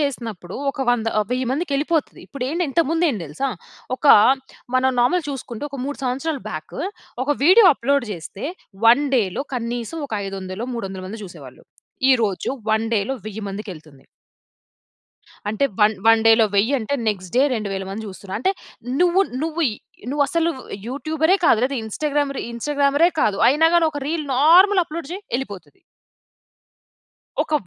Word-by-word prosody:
చేసినప్పుడు 230 - -4
ఒక 270 - -4
వంద 230 -2 0
ఆహ్, 210 - -2
1000 255 0 -1
మందికెళ్ళిపోతది. 305 +1 -1
ఇప్పుడేంటి 280 +6 -2
ఇంతకుముందేంటి 325 - +1
తెలుసా? 155 - -3 0.5
ఒక 285 - -3 0.7
మనం 260 +1 +3
నార్మల్ 300 +7 +2
చూసుకుంటే 260 -2 -6
ఒక 280 - -6
3 290 - -5
సంవత్సరాలు 275 +4 -2
బ్యాకు - - -6 0.4
ఒక 290 - -1
వీడియో 375 +4 +7
అప్లోడ్ 275 0 0
జేస్తే 180 - -8 0.4
1 245 +6 +6
డేలో 205 +4 0
కనీసం 240 +5 -4
ఒక - - -12
ఐదు 195 - -5
వందలో, 190 +6 -5
300 195 -4 -5
మంది 215 +2 -7
చూసేవాళ్ళు. 145 -8 -12 0.5
ఈరోజు 215 -7 0 0.2
1 220 +1 +2
డేలో 220 +4 0
1000 215 0 -6
మందికెళ్తుంది. 165 -9 -9 1.4
అంటే 220 +6 0 0.2
వన్ 210 +1 +5
వన్ 225 0 +6
డేలో 225 0 +6
1000 225 +8 +3
అంటే 240 +5 -2
నెక్స్ట్ 185 -4 -3
డే 260 - +6
2000 195 -3 -3
మంది 220 +3 -5
జూస్తున్న. 195 0 -7
అంటే 260 - +1 0.5
నువ్వు 360 +2 +4 0.2
నువ్వి 320 -3 0 0.4
నువ్వసలు 295 +4 +1 0.4
యూట్యూబరే 315 +6 +1
కాదు 220 - +5
లేతే 275 +1 -1
ఇన్‌స్టాగ్రామర్ 285 +4 -1
ఇన్‌స్టాగ్రామరే 285 +6 +2
కాదు. 200 -2 +2
అయినా 300 +5 +4
గాని 335 -1 +5
ఒక 290 - -5
రీల్ 310 -1 -2
నార్మల్ 365 +7 +6
అప్లోడ్ 325 -1 -7
జెయ్ 395 +3 -6
ఎళ్ళిపోతది. 265 - -8 1.6
ఒక - - -10
260 Hz, 140 wpm, -21 LUFS, 215-300 Hz, 1.6 s, వీడియో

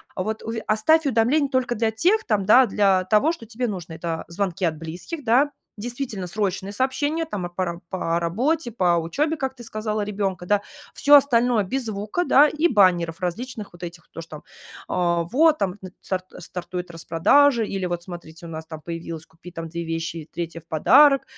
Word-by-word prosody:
Вот, 215 +4 -3
уве 225 0 -4
оставь 305 +9 +3
уведомление 265 +4 +2
только 255 -2 0
для 225 0 0
тех 370 - +2
там, 210 -4 0
да, 245 +5 +7
для 195 -2 +2
того, 215 - +3
что 235 -9 -9
тебе 240 +3 -3
нужно: 180 -6 -6
это 165 0 -4
звонки 185 +1 -3
от 160 -3 +1
близких, 175 - -7
да, 260 +5 +4 0.3
действительно 235 -3 -4
срочные 195 0 -2
сообщения, 270 +8 -1
там 200 - -4
и - - -14
пара 175 -1 -3
по 170 -3 -1
работе, 240 - 0
по 180 -6 +2
учебе, 280 - -1
как 265 -3 -3
ты 240 - -11
сказала, 215 -1 -3
ребенка, 195 -3 -3
да. 205 +2 +2 0.3
Всё 290 +1 +6
остальное- 245 -5 +4
без 265 +7 -2
звука, 215 - -2
да, 295 -3 +6
и 305 +3 +1
баннеров 175 - +3
различных 210 +4 -5
вот 175 +1 -13
этих, 175 -1 -8
то, 165 - -7
что, 155 -2 -10 0.4
а, 170 -1 +1
вот 305 - +3
там 185 -7 -1 0.3
стар 185 -1 -2 0.2
стартует 180 0 -6
распродажи 220 - +3
или 195 -2 -3
вот 175 -1 -3
смотрите 170 -2 -10
у 165 - -8
нас 160 0 -7
там 160 -1 -8
появилась 165 -1 -6
"купи 165 +2 -14
там 165 -1 -6
2 170 +1 -5
вещи 165 0 -3
и 155 -1 -9
3 165 -1 -5
в 165 - -32
подарок", 275 - +5
200 Hz, 190 wpm, -23 LUFS, 170-250 Hz, 0.4 s, да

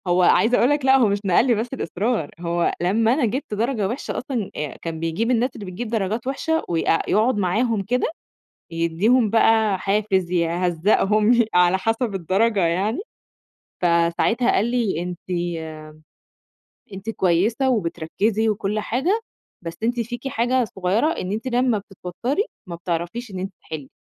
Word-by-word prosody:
هو 180 +1 +3
عايزة 225 +7 +4
أقول 245 - +3
لك 290 -2 +1
لأ، 265 0 +6
هو 245 -4 +4
مش 200 0 0
نقل 195 +7 +3
لي 240 - +4
بس 220 +3 -2
الإصرار 210 - -2
هو 170 0 0
لمّا 220 +6 +2
أنا 270 -2 +1
جيبت 255 +3 -3
درجة 220 -1 0
وحشة 240 +7 -4
أصلًا، 245 -6 -3
آآ، 150 -1 -4
كان 165 -1 -5
بيجيب 165 +9 -1
الناس 245 +1 +2
اللي 205 - -7
بتجيب 190 +6 -5
درجات 220 +2 -2
وحشة 320 +4 -1
ويق 165 -1 +1
يقعد 220 +2 +2
معاهم 215 +3 +1
كده 250 +6 0 0.6
يدّيهم 180 +8 +2
بقى 220 -2 +3
حافز، 195 -2 0
يهزقهم، 180 +5 +2
يه 235 -1 +4
على 180 +1 +4
حسب 225 +2 -1
الدرجة 195 +4 +1
يعني، 190 +7 0 0.8
فساعتها 170 +8 +2
قال 205 - +2
لي: 230 -9 0
"أنتِ 180 -1 -5 1.7
أنتِ 195 +3 -5
كويسة 215 +7 +1
وبتركزي 210 +1 0
وكل 210 0 -1
حاجة، 305 - 0 0.4
بس 165 -1 -6
أنتِ 240 +1 0
فيكِ 240 +3 -4
حاجة 250 +1 +1
صغيرة 190 +4 0
إن 190 - -4
أنتِ 220 +4 -4
لمّا 245 -2 +2
بتتوتري 205 - -3 0.2
ما 170 -2 -6
بتعرفيش 175 +7 -4
إن 190 - -6
أنتِ 190 +1 -4
تحِلّي. 150 -4 -8
210 Hz, 155 wpm, -22 LUFS, 180-240 Hz, 1.7 s, لأ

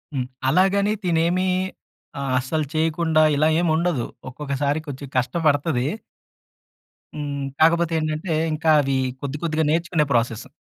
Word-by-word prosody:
హ్మ్. 130 - -1 0.2
అలాగని 200 +5 +3
తినేమీ 175 +2 +1 0.7
ఆహ్, 135 -2 -2
అస్సలు 150 +4 -1
చేయకుండా 160 0 +2
ఇలా 155 +2 +3
ఏముండదు. 165 -5 +1 0.2
ఒక్కొక్కసారి 140 +2 -2
కొంచెం 140 0 -7
కష్టబడతదీ. 145 0 +1 1.3
హ్మ్. 145 -2 -4 0.2
కాకపోతే 170 +1 +4
ఏంటంటే, 155 +2 -2 0.2
ఇంకా 160 +1 0
అవి 135 -1 0 0.2
కొద్ది, 140 0 -4
కొద్దిగా 160 -1 0
నేర్చుకునే 165 -1 +1
ప్రాసెస్సు. 115 -1 -1
155 Hz, 115 wpm, -22 LUFS, 140-170 Hz, 1.3 s, కాకపోతే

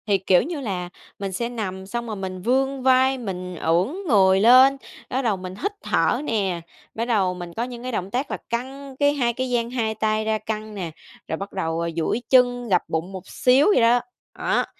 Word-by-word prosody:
Thì, 200 -2 +3
kiểu 185 -1 +3
như 310 +3 -4
là, 185 -7 -3 0.3
mình 195 -1 -3
sẽ 235 +6 -2
nằm 190 -5 -5
xong 235 +3 -4
rồi 220 - -4
mình 185 -2 -5
vươn 265 +4 0
vai, 260 +1 +4
mình 185 -6 -5
ưỡn 170 +3 +1 0.2
người 190 -6 +5
lên, 255 +5 +7 0.3
bắt 260 - 0
đầu 220 -6 0
mình 185 0 -7
hít 400 - -2
thở - - +1
nè, 195 - -1 0.3
bắt 230 - -1
đầu 195 -6 +2
mình 175 -1 -8
có 230 - -2
những 245 -1 -7
cái 255 - -4
động 190 -4 -3
tác 260 +5 -2
là - - -2
căng 265 +3 -5
cái 285 0 +4
hai 245 -5 0
cái 255 +2 -3
dang 235 -1 0
2 225 -3 -1
tay 215 0 0
ra 220 0 +1
căng 215 0 -5
nè, 175 -5 -4 0.4
rồi 160 - -2
bắt 195 +2 -7
đầu, 165 -3 -2
ờ, 170 0 -1
duỗi 190 +8 0
chân, 245 -2 +3
gập 180 -2 +4
bụng 160 +4 -2
một 190 -2 -8
xíu 260 +3 +3
vậy - - +4
đó. 235 +1 +5 0.4
Đó, - - +1
220 Hz, 220 wpm, -23 LUFS, 190-250 Hz, 0.4 s, lên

